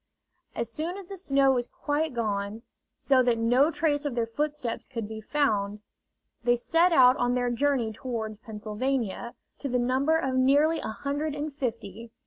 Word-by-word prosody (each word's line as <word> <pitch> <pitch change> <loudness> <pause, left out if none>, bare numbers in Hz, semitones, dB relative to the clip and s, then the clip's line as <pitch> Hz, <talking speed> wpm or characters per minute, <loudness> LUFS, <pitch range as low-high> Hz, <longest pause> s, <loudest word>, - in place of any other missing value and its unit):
As 235 - -2
soon 325 - -3
as 395 - -8
the 390 - -8
snow 275 -7 +3
was 245 -2 0
quite 295 -1 -2
gone, 210 -1 -2 0.3
so 265 -2 +3
that 245 -2 +2
no 245 +6 +4
trace 310 -3 0
of 285 -4 -3
their 235 -1 +1
footsteps 290 0 -3
could 230 -5 -5
be 220 0 -7
found, 210 -6 0 0.6
they 240 +1 +3
set 330 +9 +3
out 255 -5 +7
on 245 0 +1
their 245 -1 0
journey 245 -3 +1
toward 220 -2 -5
Pennsylvania, 225 +2 -3 0.2
to 280 - -3
the 250 - +1
number 260 +6 +2
of 265 -5 -1
nearly 285 +5 +3
a - - -4
hundred 285 +6 -3
and 295 0 -4
fifty. 230 -4 -5
255 Hz, 170 wpm, -27 LUFS, 230-290 Hz, 0.6 s, out